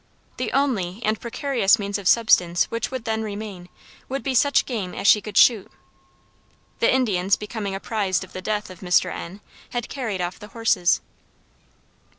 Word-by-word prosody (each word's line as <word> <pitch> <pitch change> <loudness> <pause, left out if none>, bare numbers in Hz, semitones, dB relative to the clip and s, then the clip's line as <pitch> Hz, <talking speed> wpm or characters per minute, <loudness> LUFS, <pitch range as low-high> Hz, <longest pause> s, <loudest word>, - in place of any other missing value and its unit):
The - - -2
only 220 -9 0
and 215 0 0
precarious 240 -3 +2
means 200 -1 -3
of 195 - -4
subsistence 180 -7 +4
which 230 -1 -2
would 260 -3 -6
then 220 -1 -1
remain, 205 -4 -6 0.4
would 270 -2 -3
be 265 - -1
such 285 +3 +3
game 205 -8 -4
as - - -5
she 210 - +6
could 210 -1 -6
shoot. 225 -6 +5 1.1
The - - +4
Indians 200 -7 +2
becoming 210 -2 -5
apprised 195 -2 -1
of 185 - -14
the 185 - -6
death 210 0 -3
of 180 - -12
Mr. 180 -1 +2
N., 190 +5 -8 0.3
had 240 -1 -4
carried 225 -9 -3
off 180 0 -3
the 210 - -10
horses. 185 -6 +2
210 Hz, 165 wpm, -23 LUFS, 185-230 Hz, 1.1 s, she